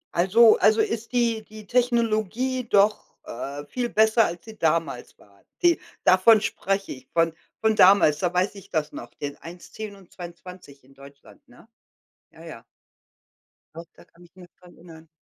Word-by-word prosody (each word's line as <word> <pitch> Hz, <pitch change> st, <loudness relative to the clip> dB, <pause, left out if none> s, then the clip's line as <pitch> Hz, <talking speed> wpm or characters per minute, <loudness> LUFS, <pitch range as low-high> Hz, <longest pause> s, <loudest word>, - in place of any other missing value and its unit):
Also 215 Hz, +6 st, +5 dB
also, 215 Hz, +3 st, +3 dB
ist 230 Hz, 0 st, -2 dB
die 235 Hz, -3 st, 0 dB
die 215 Hz, 0 st, -13 dB
Technologie 235 Hz, +1 st, 0 dB
doch, 205 Hz, +1 st, +1 dB
äh, 140 Hz, +4 st, -7 dB
viel 240 Hz, -, -4 dB
besser, 220 Hz, +1 st, +3 dB
als 170 Hz, 0 st, -6 dB
sie 220 Hz, -1 st, -12 dB
damals 165 Hz, -5 st, -2 dB
war. 100 Hz, -1 st, -24 dB, 0.2 s
Die 345 Hz, -1 st, +4 dB, 0.2 s
davon 190 Hz, +4 st, +5 dB
spreche 195 Hz, -2 st, -3 dB
ich, 130 Hz, -1 st, -11 dB
von 165 Hz, -1 st, +1 dB, 0.3 s
von 220 Hz, -1 st, +2 dB
damals, 185 Hz, -7 st, +5 dB
da 175 Hz, 0 st, -1 dB
weiß 180 Hz, +3 st, 0 dB
ich 200 Hz, -3 st, -14 dB
das 155 Hz, -1 st, -2 dB
noch, -, -, -10 dB
den 145 Hz, -1 st, -6 dB
1, 170 Hz, +3 st, -12 dB
10 215 Hz, -2 st, -8 dB
und 195 Hz, -3 st, -20 dB
22 175 Hz, -5 st, -12 dB
in 135 Hz, +1 st, -22 dB
Deutschland, 140 Hz, -, -17 dB
ne? 245 Hz, -3 st, -20 dB, 0.6 s
Ja, -, -, -17 dB
ja. -, -, -11 dB, 1.1 s
Doch, 165 Hz, +1 st, -9 dB
da -, -, -18 dB
kann 175 Hz, -, -22 dB
ich 175 Hz, +1 st, -22 dB
mich 180 Hz, -2 st, -15 dB
dran 180 Hz, -1 st, -18 dB
erinnern. 165 Hz, -1 st, -16 dB
190 Hz, 170 wpm, -24 LUFS, 165-220 Hz, 1.1 s, Also